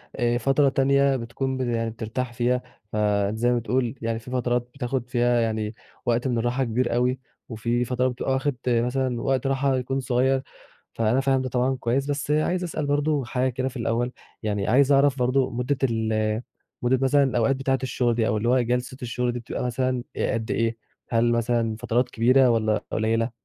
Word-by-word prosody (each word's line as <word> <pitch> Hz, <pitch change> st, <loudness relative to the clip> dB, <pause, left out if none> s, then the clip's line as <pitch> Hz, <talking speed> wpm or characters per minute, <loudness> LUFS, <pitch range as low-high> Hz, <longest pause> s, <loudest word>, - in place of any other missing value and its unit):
آآ 120 Hz, -2 st, +1 dB
فترة 135 Hz, +3 st, +3 dB
تانية 140 Hz, 0 st, +3 dB
بتكون 130 Hz, +2 st, -3 dB
ب -, -, -3 dB
يعني 115 Hz, -2 st, -1 dB
بترتاح 115 Hz, +3 st, -4 dB
فيها، 125 Hz, +1 st, +1 dB, 0.3 s
فزي 105 Hz, +3 st, +1 dB
ما 120 Hz, -, +2 dB
بتقول 120 Hz, +3 st, -1 dB
يعني 115 Hz, 0 st, -2 dB
في 125 Hz, +2 st, -11 dB
فترات 120 Hz, -1 st, 0 dB
بتاخد 125 Hz, -2 st, -2 dB
فيها 120 Hz, -1 st, +2 dB
يعني 110 Hz, -1 st, -1 dB, 0.3 s
وقت 120 Hz, +2 st, +1 dB
من 120 Hz, -2 st, 0 dB
الراحة 120 Hz, +3 st, 0 dB
كبير 120 Hz, 0 st, 0 dB
أوي، 125 Hz, +2 st, +1 dB, 0.3 s
وفي 120 Hz, +2 st, -1 dB
فترة 125 Hz, +1 st, 0 dB
بتبقى 125 Hz, +1 st, -2 dB
واخد 135 Hz, 0 st, 0 dB
مثلًا 125 Hz, +1 st, +1 dB
وقت 135 Hz, 0 st, 0 dB
راحة 135 Hz, 0 st, +1 dB
يكون 135 Hz, +2 st, -2 dB
صغير، 130 Hz, +1 st, +1 dB, 0.5 s
فأنا 115 Hz, +3 st, +1 dB
فاهم 135 Hz, -1 st, +2 dB
ده 130 Hz, -, -3 dB
طبعًا 130 Hz, +2 st, +1 dB
كويس. 130 Hz, +3 st, 0 dB
بس 145 Hz, +1 st, -2 dB
عايز 175 Hz, +4 st, +1 dB
أسأل 155 Hz, -3 st, -3 dB
برضه 145 Hz, -1 st, +1 dB
حاجة 130 Hz, +1 st, 0 dB
كده 130 Hz, +1 st, -2 dB
في 130 Hz, -, -9 dB
الأول، 120 Hz, +2 st, -1 dB, 0.3 s
يعني 105 Hz, -2 st, -1 dB
عايز 135 Hz, +5 st, +4 dB
أعرف 140 Hz, -1 st, +4 dB
برضه 130 Hz, +1 st, +2 dB
مدة 125 Hz, +3 st, -1 dB
ال 110 Hz, -2 st, 0 dB, 0.4 s
مدة 125 Hz, +1 st, +2 dB
مثلًا 140 Hz, +1 st, +4 dB
الأوقات 130 Hz, 0 st, +2 dB
بتاعة 135 Hz, -1 st, 0 dB
الشغل 120 Hz, -2 st, 0 dB
دي، 115 Hz, -2 st, +1 dB
أو 105 Hz, -, +1 dB
اللي 115 Hz, +3 st, 0 dB
هو 130 Hz, 0 st, +4 dB
جلسة 125 Hz, +2 st, -1 dB
الشغل 125 Hz, 0 st, -1 dB
دي 120 Hz, -, -4 dB
بتبقى 115 Hz, -, -5 dB
مثلًا 125 Hz, 0 st, -1 dB
قد 115 Hz, -3 st, -1 dB
إيه، 115 Hz, 0 st, 0 dB, 0.3 s
هل 120 Hz, 0 st, +2 dB
مثلًا 115 Hz, -1 st, +1 dB
فترات 120 Hz, +4 st, 0 dB
كبيرة 125 Hz, +3 st, +4 dB
والَّا 110 Hz, -2 st, +1 dB
قليلة؟ 115 Hz, +2 st, 0 dB
125 Hz, 185 wpm, -25 LUFS, 115-130 Hz, 0.5 s, عايز